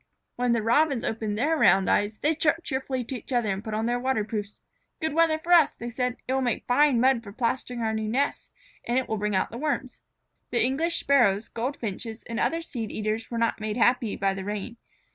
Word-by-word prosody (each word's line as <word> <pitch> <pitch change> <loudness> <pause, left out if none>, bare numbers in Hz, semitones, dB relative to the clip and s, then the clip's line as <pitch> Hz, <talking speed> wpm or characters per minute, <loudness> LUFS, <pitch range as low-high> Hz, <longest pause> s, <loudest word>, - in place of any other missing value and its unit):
When 245 -1 +1
the 230 -2 0
Robins 270 +2 +2
opened 220 -2 -2
their 305 +8 +2
round 195 - +4
eyes, 205 +1 +1
they 300 +7 +1
chirped 325 +1 +1
cheerfully 265 -3 -2
to 260 - -5
each 220 - -13
other 240 -5 +1
and 195 +2 -4
put 220 -2 -4
on 220 +1 -1
their 240 +1 0
waterproofs. 215 -5 -2 0.4
"Good 315 -3 -1
weather 325 0 +3
for 335 +3 -5
us," 330 -4 +6
they 240 +1 -6
said. 250 +1 -2
"It 260 - 0
will 265 - +1
make 245 -2 -1
fine 265 0 +4
mud 255 -1 +3
for 205 -3 -10
plastering 245 +1 -2
our 220 -1 0
new 220 -1 -2
nests, 275 +5 -1 0.3
and 240 - -1
it 260 - 0
will 220 - -2
bring 210 -1 -1
out 190 - 0
the 235 - -6
Worms." 285 -3 -3 0.5
The 235 -2 +2
English 320 +7 +1
Sparrows, 225 -7 +3
Goldfinches, 230 -2 -4
and 230 0 -5
other 330 0 0
seed 230 -9 -5
eaters 215 +1 -3
were 235 - -4
not 230 -1 0
made 215 +1 -2
happy 245 -2 +2
by 195 0 0
the 190 0 -5
rain. 210 +4 -5
240 Hz, 220 wpm, -26 LUFS, 215-265 Hz, 0.5 s, us